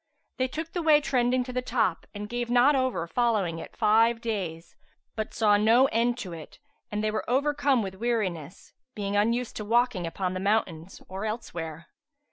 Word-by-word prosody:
They 255 - +1
took 315 +5 -6
the 350 - -1
way 310 -2 +5
trending 255 -3 +1
to 250 0 -8
the 250 - -1
top 230 -8 -1
and 205 0 -5
gave 240 +1 -3
not 250 +4 +5
over 260 -10 0
following 200 -4 0
it - - -10
five 225 +1 +4
days, 185 -8 -4 0.4
but 220 -1 -3
saw 210 -2 +3
no 225 +5 +5
end 235 +2 +1
to 180 - -7
it 160 -2 -10 0.3
and 210 0 -2
were 215 +1 -2
overcome 280 -1 +2
with 190 -1 -5
weariness, 190 -7 -3 0.2
being 200 -1 -3
unused 230 +4 +1
to 215 - -4
walking 230 -5 +1
upon 185 +2 -3
the 185 - -3
mountains 190 -4 -1
or 190 +3 -5
elsewhere. 170 -8 -5
220 Hz, 175 wpm, -27 LUFS, 190-245 Hz, 0.4 s, way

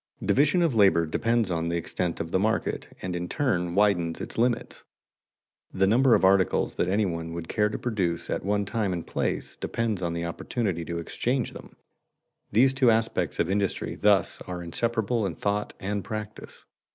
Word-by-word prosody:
Division 150 +6 +3
of 165 -5 +2
labor 95 -6 +4
depends 115 +5 0
on 85 0 -1
the 85 - 0
extent 85 +1 -2
of 80 0 -4
the 95 - +2
market, 110 +3 -1 0.2
and 90 -1 -3
in 90 0 -4
turn 90 - 0
widens 90 -5 +2
its - - -5
limits. 120 0 -1 0.9
The 95 0 +2
number 120 +5 +5
of - - +3
articles 95 -1 +3
that 90 - +1
any 100 +2 +2
one 85 -2 -4
would 85 -1 -6
care 105 -1 +1
to - - -4
produce 95 -8 -2
at - - -2
one 100 +1 0
time 105 -2 -1
and 85 -2 -4
place - - -2
depends 110 -5 -2
upon 85 -2 -1
the 85 0 -3
opportunity 85 0 -2
to 85 0 -4
exchange 120 +9 -1
them. - - -12 0.8
These 130 +5 +4
two 130 -2 +4
aspects 115 0 +1
of - - +2
industry 100 0 -1
thus 100 -3 +2
are 90 -1 -5
inseparable 115 +5 -1
in - - -5
thought 105 0 -2
and 100 0 -3
practice. 105 -1 -7
100 Hz, 180 wpm, -26 LUFS, 85-115 Hz, 0.9 s, number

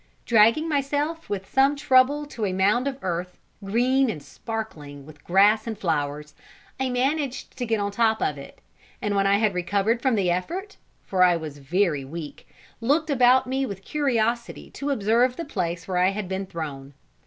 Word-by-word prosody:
Dragging 230 +7 +4
myself 295 +2 -1
with 195 -2 -4
some 270 +2 +3
trouble 280 +1 +3
to 245 -6 -7
a 185 - -2
mound 205 +8 +2
of 270 -1 -3
earth, 180 0 -3 0.3
green 250 +6 +2
and 150 -9 -5
sparkling 150 -11 -7
with 150 -1 -15
grass 205 +5 +4
and 220 -2 -4
flowers, 150 -5 -2 0.5
I 265 -1 0
managed 270 +2 -1
to 245 - -3
get 225 -1 +1
on 200 0 -1
top 220 +1 +2
of 150 - 0
it; 140 - -12 0.4
and 205 -1 -2
when 195 0 +2
I 200 0 +4
had 215 -1 +1
recovered 200 +6 0
from 260 -3 +2
the 190 -4 +1
effort, 365 - -4 0.3
for 185 -2 -1
I 180 -1 +6
was 155 -3 -8
very 155 0 0
weak, 150 +2 -8 0.3
looked 290 +7 +1
about 255 -1 +5
me 265 +1 -1
with 195 -1 -8
curiosity 240 -5 -1
to 285 - -4
observe 240 +1 +2
the 335 - -5
place 170 - -3
where 185 -2 -1
I 180 +1 +4
had 195 -1 -4
been 190 +1 -4
thrown. 145 -5 -7
215 Hz, 180 wpm, -24 LUFS, 180-260 Hz, 0.5 s, I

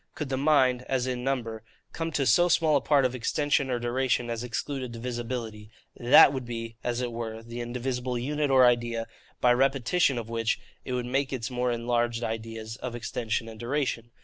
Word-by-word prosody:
Could 150 -3 -4
the 135 - 0
mind, 130 -3 +3
as 130 -2 +1
in 125 -1 -3
number, 120 -5 -2 0.3
come 165 0 -3
to 140 - +1
so 175 +9 +5
small 160 -3 +3
a 140 - +3
part 140 -1 +3
of 125 - 0
extension 140 +2 0
or 125 - 0
duration 120 0 0
as 115 0 -3
excluded 130 +1 -4
divisibility, 115 -2 -5 0.3
THAT 125 +3 +7
would 130 -2 -3
be, 115 -1 -5
as 120 0 -1
it 120 -1 -2
were, 115 -1 -5
the 115 +1 -6
indivisible 125 +1 -3
unit 145 +4 -1
or 130 -1 +6
idea; 120 -1 +1 0.4
by 125 -1 +5
repetition 135 +3 +2
of 115 -2 -4
which, 115 -1 -1 0.2
it 130 - -5
would 125 -1 -1
make 135 +2 -1
its 130 -1 -3
more 125 0 0
enlarged 120 0 0
ideas 110 0 -5
of 125 -2 -5
extension 115 -1 -3
and 110 -1 -10
duration. 120 -2 -2
125 Hz, 190 wpm, -27 LUFS, 115-135 Hz, 0.4 s, THAT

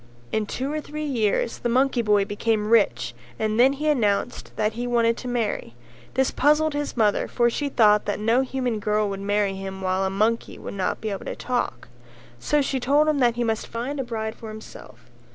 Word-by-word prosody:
In 215 -1 -1
two 265 +6 -3
or 305 - -2
three 305 +1 -5
years 230 -4 0
the 240 - -1
monkey 255 0 +2
boy 210 -3 +3
became 210 +1 -1
rich 160 - +3 0.2
and 215 +1 -1
then 265 +3 +6
he 300 +2 -3
announced 235 -5 0
that 215 0 0
he 240 +2 -3
wanted 230 -1 +2
to 255 - -7
marry; 225 - -2 0.4
this 265 0 +2
puzzled 300 +2 +3
his 290 -3 -3
mother 210 -3 +2
for 240 -1 +2
she 285 +4 -2
thought 210 -5 +4
that 205 - -2
no 225 +4 +3
human 255 -4 -2
girl 210 0 +1
would 195 -1 -4
marry 205 0 +1
him 190 0 -6
while 185 0 0
a 190 - +1
monkey 215 +4 0
would - - -7
not 190 -2 -2
be 220 -1 -3
able 195 - -5
to - - -4
talk; 245 - -3 0.5
so 295 - +1
she 270 -1 -1
told 285 +5 +3
him 305 -2 +2
that 240 -2 +3
he 240 - 0
must 225 -1 -1
find 255 +5 -4
a - - 0
bride 220 -2 -4
for 225 - -10
himself. 175 - -11
230 Hz, 210 wpm, -24 LUFS, 210-260 Hz, 0.5 s, then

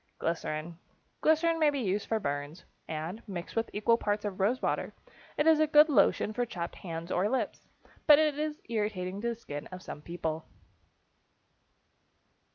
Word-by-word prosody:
=Glycerin.= 165 0 -3 0.4
Glycerin 325 +1 +3
may 305 -2 +5
be 285 - -2
used 205 -3 -1
for 225 - +1
burns, 145 0 -4 0.2
and, 160 +7 -4
mixed 180 -3 -6
with 225 0 0
equal 230 +3 +2
parts 205 0 -1
of 200 -2 -4
rose 220 +7 +2
water, - - -2 0.4
it 295 - +2
is 320 -1 +6
a 310 - +4
good 300 +1 +7
lotion 215 -3 +3
for 245 - 0
chapped 175 -7 -4
hands 170 -1 -6
or 190 +4 +2
lips, 245 -5 -2 0.4
but 295 -2 +10
it 305 -1 +3
is 305 0 -2
irritating 205 -4 -2
to 235 - -1
the 235 - -1
skin 145 -10 -7
of 185 0 -9
some 150 - -8
people. 160 -1 -4
210 Hz, 165 wpm, -30 LUFS, 170-260 Hz, 0.4 s, but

